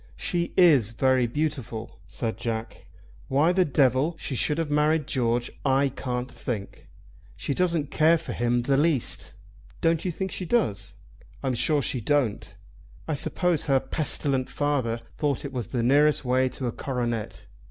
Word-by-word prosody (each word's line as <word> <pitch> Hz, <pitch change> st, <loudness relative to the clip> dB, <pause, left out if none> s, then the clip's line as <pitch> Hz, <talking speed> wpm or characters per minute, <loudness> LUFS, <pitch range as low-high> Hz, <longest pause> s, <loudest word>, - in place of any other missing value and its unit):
"She 170 Hz, -1 st, -2 dB
is 150 Hz, -, +6 dB
very 130 Hz, 0 st, +2 dB
beautiful," 125 Hz, -5 st, -4 dB
said 115 Hz, -2 st, -3 dB
Jack. 115 Hz, -1 st, -5 dB, 0.4 s
"Why 145 Hz, +6 st, +3 dB
the 185 Hz, 0 st, +4 dB
devil 140 Hz, +1 st, +2 dB
she 140 Hz, -, -5 dB
should 150 Hz, +5 st, 0 dB
have 165 Hz, -3 st, -2 dB
married 150 Hz, +1 st, +2 dB
George, 120 Hz, -4 st, 0 dB
I 135 Hz, 0 st, +3 dB
can't 125 Hz, -1 st, -4 dB
think. 105 Hz, -6 st, -6 dB, 0.5 s
She -, -, -3 dB
doesn't 170 Hz, -4 st, 0 dB
care 160 Hz, +2 st, +4 dB
for 165 Hz, -, -6 dB
him 120 Hz, 0 st, +1 dB
the 135 Hz, +2 st, +2 dB
least." 150 Hz, -4 st, 0 dB, 0.4 s
"Don't 165 Hz, -1 st, +1 dB
you 185 Hz, -, -1 dB
think 190 Hz, +2 st, -3 dB
she -, -, -4 dB
does?" 105 Hz, -, 0 dB, 0.5 s
"I'm 130 Hz, -, 0 dB
sure 145 Hz, +4 st, +2 dB
she 125 Hz, -, -2 dB
don't. 130 Hz, -3 st, 0 dB, 0.5 s
I 160 Hz, -, -1 dB
suppose 175 Hz, +2 st, +1 dB
her 135 Hz, -2 st, +3 dB
pestilent 135 Hz, -1 st, -1 dB
father 130 Hz, -6 st, -1 dB, 0.2 s
thought 145 Hz, -2 st, 0 dB
it 140 Hz, -, -6 dB
was 120 Hz, -6 st, -3 dB
the 120 Hz, -2 st, -2 dB
nearest 145 Hz, +3 st, +3 dB
way 130 Hz, +1 st, +2 dB
to 130 Hz, +1 st, -6 dB
a 120 Hz, -, -1 dB
coronet. 120 Hz, -4 st, -3 dB
135 Hz, 160 wpm, -26 LUFS, 120-155 Hz, 0.5 s, is